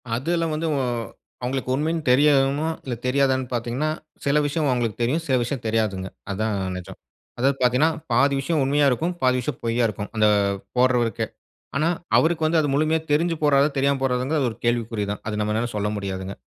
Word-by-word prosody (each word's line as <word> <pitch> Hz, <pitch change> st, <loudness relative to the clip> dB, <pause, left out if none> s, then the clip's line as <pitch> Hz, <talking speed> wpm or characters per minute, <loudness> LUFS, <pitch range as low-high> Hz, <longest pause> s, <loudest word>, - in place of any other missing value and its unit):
அது 130 Hz, +7 st, -3 dB
எல்லாம் 165 Hz, -2 st, 0 dB
வந்து 160 Hz, +2 st, -2 dB, 0.2 s
அ -, -, 0 dB, 0.6 s
அவங்களுக்கு 130 Hz, +1 st, -2 dB
உண்மைன்னு 160 Hz, +4 st, 0 dB
தெரியயுமா, 140 Hz, +2 st, +4 dB, 0.2 s
இல்ல 130 Hz, -, -3 dB
தெரியாதான்னு 130 Hz, 0 st, +2 dB
பார்த்தீங்கன்னா, 120 Hz, +5 st, -1 dB, 0.4 s
சில 140 Hz, +1 st, +3 dB
விஷயம் 150 Hz, +1 st, 0 dB
அவங்களுக்கு 120 Hz, -4 st, -1 dB
தெரியும். 130 Hz, +8 st, +1 dB
சில 130 Hz, -, +2 dB
விஷயம் 120 Hz, +1 st, -3 dB
தெரியாதுங்க. 110 Hz, -4 st, 0 dB, 0.2 s
அதுதாங்க 100 Hz, 0 st, -1 dB
நெஜம். 90 Hz, -1 st, -8 dB, 0.4 s
அதாவது 135 Hz, +3 st, +2 dB
பார்த்தீங்கன்னா, 125 Hz, +5 st, +4 dB, 0.2 s
பாதி 140 Hz, +4 st, +4 dB
விஷயம் 150 Hz, +2 st, 0 dB
உண்மையா 145 Hz, +2 st, +2 dB
இருக்கும், 160 Hz, +8 st, 0 dB
பாதி 130 Hz, 0 st, +3 dB
விஷயம் 120 Hz, -, -4 dB
பொய்யா 115 Hz, +1 st, +1 dB
இருக்கும் 105 Hz, -1 st, -5 dB
அந்த 110 Hz, -1 st, +4 dB, 0.5 s
போடுறவருக்கே. 125 Hz, -3 st, +2 dB, 0.5 s
ஆனா, 155 Hz, +4 st, +2 dB, 0.3 s
அவருக்கு 160 Hz, -1 st, +2 dB
வந்து, 160 Hz, +1 st, +3 dB
அது 145 Hz, -, -1 dB
முழுமையா 155 Hz, +2 st, +2 dB
தெரிஞ்சு 165 Hz, +2 st, +2 dB
போடுறாரா? 140 Hz, 0 st, +4 dB
தெரியாம 140 Hz, 0 st, +2 dB
போடுறாராங்குது 130 Hz, +2 st, +1 dB
ஒரு 110 Hz, -, -9 dB
கேள்விக்குறி 115 Hz, -3 st, 0 dB
தான். 105 Hz, -, -5 dB
அது 105 Hz, 0 st, -2 dB
நம்மனால 110 Hz, +3 st, -1 dB
சொல்ல 105 Hz, 0 st, 0 dB
முடியாதுங்க. 95 Hz, -1 st, -5 dB
130 Hz, 170 wpm, -23 LUFS, 115-145 Hz, 0.6 s, தெரியயுமா